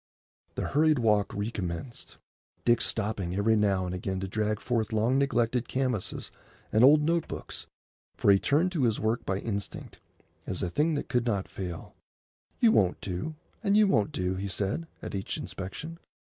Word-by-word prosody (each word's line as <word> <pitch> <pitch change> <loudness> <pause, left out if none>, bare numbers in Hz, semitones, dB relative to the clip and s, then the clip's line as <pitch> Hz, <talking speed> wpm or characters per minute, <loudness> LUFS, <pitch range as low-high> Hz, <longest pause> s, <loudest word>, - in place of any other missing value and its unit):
The - - -2
hurried 155 +1 +4
walk 105 -4 +2
recommenced, 100 +1 -5 0.5
Dick 120 -1 +4
stopping 100 -5 -1
every 110 +3 +3
now 100 -3 +2
and 90 - -3
again 95 +1 -3
to 95 - -2
drag 105 +1 -1
forth 115 -3 -1
long 115 +5 +2
neglected 120 -3 +1
canvases 130 -6 -2 0.4
and 110 +2 +4
old 150 +3 +7
note 165 +1 +1
books; - - -6 0.5
for 100 - +5
he 100 - +5
turned 160 - +2
to 155 -8 +1
his 110 -2 +1
work 110 +3 0
by 95 - +1
instinct, 100 -1 -5 0.5
as - - -2
a 90 - -2
thing 155 - +2
that 145 - -3
could 125 -4 0
not 100 -4 0
fail. 90 -3 -6 0.7
"You 230 -2 +6
won't 95 - +3
do, 95 - -4 0.3
and 200 -1 +3
you 215 - +6
won't 105 - +2
do," 90 0 -1
he 95 +2 -3
said, 100 - -2 0.2
at - - -5
each 95 -1 -3
inspection. 155 - -6
110 Hz, 170 wpm, -29 LUFS, 95-135 Hz, 0.7 s, old